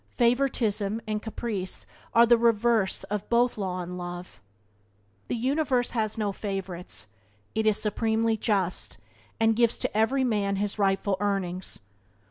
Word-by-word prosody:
Favouritism 235 -4 +2
and 215 -1 -2
caprice 215 -4 -4 0.3
are 235 +1 +7
the 235 0 +6
reverse 230 -3 +2
of 210 0 -4
both 240 +1 +3
law 185 -3 -2
and 180 +1 -6
love. 175 - -7 0.9
The - - -1
universe 260 0 +1
has 220 -3 -1
no 210 -2 0
favourites; 190 - -5 0.5
it 220 0 +1
is 215 -1 +3
supremely 225 +1 +1
just, 195 -4 -1 0.4
and 225 0 +4
gives 235 0 +3
to - - -2
every 250 +5 +3
man 205 -5 +1
his 205 +1 -2
rightful 195 0 +2
earnings. 190 -3 -2
215 Hz, 135 wpm, -27 LUFS, 195-235 Hz, 0.9 s, are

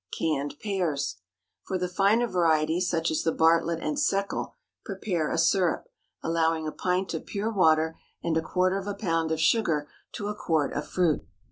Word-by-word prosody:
CANNED 145 -3 -1
PEARS. 165 - -1
✠ - - -46 0.5
For 190 - -1
the 180 0 -1
finer 200 +6 +3
varieties, 165 -2 +2
such 165 -1 0
as 160 - 0
the 165 - +1
Bartlett 165 +1 +2
and 295 - -1
Seckel, 200 -9 0 0.3
prepare 190 -5 -2
a - - -1
syrup, 170 +1 +2 0.3
allowing 165 -1 +1
a - - -2
pint 185 +1 -1
of 160 - -5
pure 210 +3 -2
water 160 -4 +3 0.2
and 165 -1 0
a 160 - +2
quarter 185 +3 +1
of 195 - -8
a 205 - -2
pound 165 -5 0
of 160 - 0
sugar 160 -5 +2 0.3
to 205 - -4
a 210 - -2
quart 160 -7 0
of 150 0 -3
fruit. 165 -1 +1
170 Hz, 180 wpm, -27 LUFS, 160-190 Hz, 0.5 s, finer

